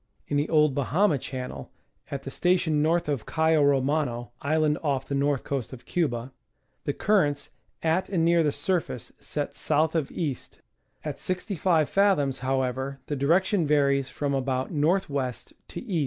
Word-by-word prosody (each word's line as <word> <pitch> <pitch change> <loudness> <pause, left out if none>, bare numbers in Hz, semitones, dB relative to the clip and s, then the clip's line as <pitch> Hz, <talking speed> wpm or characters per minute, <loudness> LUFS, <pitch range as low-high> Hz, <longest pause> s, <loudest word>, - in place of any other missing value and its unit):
In - - -2
the 145 +2 +1
old 150 -3 +4
Bahama 150 +4 +2
Channel, 125 - -6 0.4
at 140 -1 -5
the 135 - -6
station 170 -4 +2
north 165 +2 +2
of 140 -7 -2
Cayo 160 -1 +3
Romano 135 -3 +1
(island 155 +1 +1
off 140 -4 -1
the - - -3
north 140 -1 +1
coast 135 -3 -3
of 125 - -11
Cuba) 130 -7 -1 0.5
the - - +1
currents 150 -9 +1 0.3
at 165 +4 +1
and 170 -4 +1
near 170 0 +4
the 150 -2 +2
surface 165 -9 -2
set 145 -1 -4
south 155 +1 +1
of 160 -5 -1
east; 150 -7 -4 0.5
at - - -4
65 180 -4 0
fathoms, 165 -10 +2
however, 130 +1 -1
the 145 - -3
direction 170 +5 +2
varies 140 -2 +2
fi'om 140 -1 -2
about 130 -1 -1
N. 150 -4 -1
W. 145 -6 +1 0.4
to - - -7
E. 200 -9 -2
145 Hz, 160 wpm, -26 LUFS, 135-165 Hz, 0.5 s, old